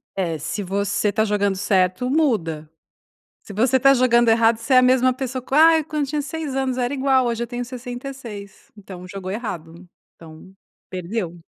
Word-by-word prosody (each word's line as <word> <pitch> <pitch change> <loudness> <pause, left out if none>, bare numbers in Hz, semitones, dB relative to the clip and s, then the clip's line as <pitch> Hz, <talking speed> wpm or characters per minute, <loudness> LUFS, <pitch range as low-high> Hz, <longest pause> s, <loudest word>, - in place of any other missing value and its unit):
É, 170 -4 -2
se 200 +7 -4
você 200 +2 -1
tá 220 +1 +1
jogando 205 -2 0
certo, 185 +4 +1
muda, 195 - 0 0.7
se 205 - -11
você 250 +5 +2
tá 275 +2 +6
jogando 240 -2 +3
errado, 225 0 +4
você 230 +4 -2
é - - +7
a - - +8
mesma 255 0 +3
pessoa 260 0 -4
com 260 +2 -4
ai 320 +1 +6
quando 300 -1 -3
eu - - -3
tinha 295 0 -1
6 300 -2 -5
anos 265 -1 -1
era 250 +1 -1
igual 265 -2 +2
hoje 235 -1 -1
eu - - -6
tenho 245 +1 -5
66, 245 -4 -9
então, 185 -3 -10
jogou 190 0 -6
errado, 180 -5 -7 0.3
então, 165 +3 -14 0.4
perdeu. 180 -1 -4
235 Hz, 185 wpm, -21 LUFS, 190-260 Hz, 0.7 s, a